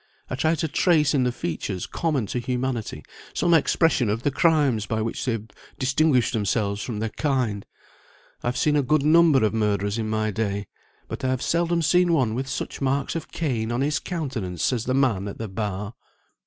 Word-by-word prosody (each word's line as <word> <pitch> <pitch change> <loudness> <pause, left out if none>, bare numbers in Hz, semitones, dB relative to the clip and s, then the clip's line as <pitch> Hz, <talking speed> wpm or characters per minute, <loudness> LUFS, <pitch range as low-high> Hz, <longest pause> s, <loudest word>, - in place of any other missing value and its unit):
I - - 0
try 160 +5 +1
to 160 +1 -1
trace 155 -1 +3
in 130 -3 +2
the 125 - +1
features 90 -2 -4
common 150 -9 -1
to 125 - -3
humanity 125 -2 -3 0.3
some 175 - +2
expression 160 -5 +3
of 110 +3 -1
the 145 - +1
crimes 140 -9 +2
by 110 -2 -1
which 115 - -3
they 125 - +1
have 110 -1 -5 0.3
distinguished 135 -1 +2
themselves 105 -1 0
from 115 -2 -4
their 110 +1 -2
kind. 125 -9 -1 0.7
I - - -4
have 125 - -1
seen 150 -1 +2
a 145 - +4
good 140 +2 +2
number 155 -5 +5
of 105 - 0
murderers 105 -1 0
in 110 -1 -2
my 110 0 0
day, 100 -1 -2 0.4
but - - -6
I - - +1
have 130 -1 -1
seldom 170 0 +1
seen 175 +3 +3
one 130 -8 +2
with 130 +3 -3
such - - -5
marks 135 +3 0
of 165 - -5
Cain 120 -8 -2
on 120 +2 -1
his 145 +1 +1
countenance 130 - -2
as 120 -2 -2
the 130 - 0
man 115 -8 +1
at 100 - -6
the 110 - -4
bar." 105 +1 -4
125 Hz, 200 wpm, -24 LUFS, 110-150 Hz, 0.7 s, number